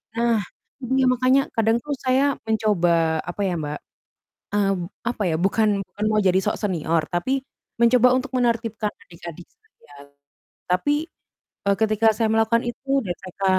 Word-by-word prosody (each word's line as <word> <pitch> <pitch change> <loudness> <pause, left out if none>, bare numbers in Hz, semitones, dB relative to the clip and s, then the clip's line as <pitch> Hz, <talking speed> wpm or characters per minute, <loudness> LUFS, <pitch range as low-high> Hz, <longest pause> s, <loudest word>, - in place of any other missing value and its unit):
Nah, 235 -1 +2 0.6
iya 265 -1 +3
makanya, 255 +2 +3
kadang 225 +1 +3
tuh 295 - -3
saya 260 +2 +3 0.2
mencoba 215 -6 +1 0.4
apa 190 +3 -5
ya, 180 - -1
Mbak, 150 0 -4 0.8
eee, 200 -1 +2
p - - -4 0.3
apa 230 - -4
ya, - - 0
bukan 215 +2 +2 0.2
bukan 210 - -6
mau 215 0 +2
jadi 185 0 +4
sok - - 0
senior, 165 -4 0
tapi 175 +10 0 0.5
mencoba 245 +1 +5
untuk 260 +1 -3
menertibkan 230 -3 -1
adik-adik 170 -2 -11
saya, 430 - -24 0.8
tapi, 185 +11 +2 0.7
eee, 200 - +3
ketika 220 0 +2
saya 225 -1 +1
melakukan 225 +1 +2
itu 260 +3 -8 0.2
dan 175 - -2
saya 190 +1 -7
220 Hz, 150 wpm, -23 LUFS, 185-235 Hz, 0.8 s, mencoba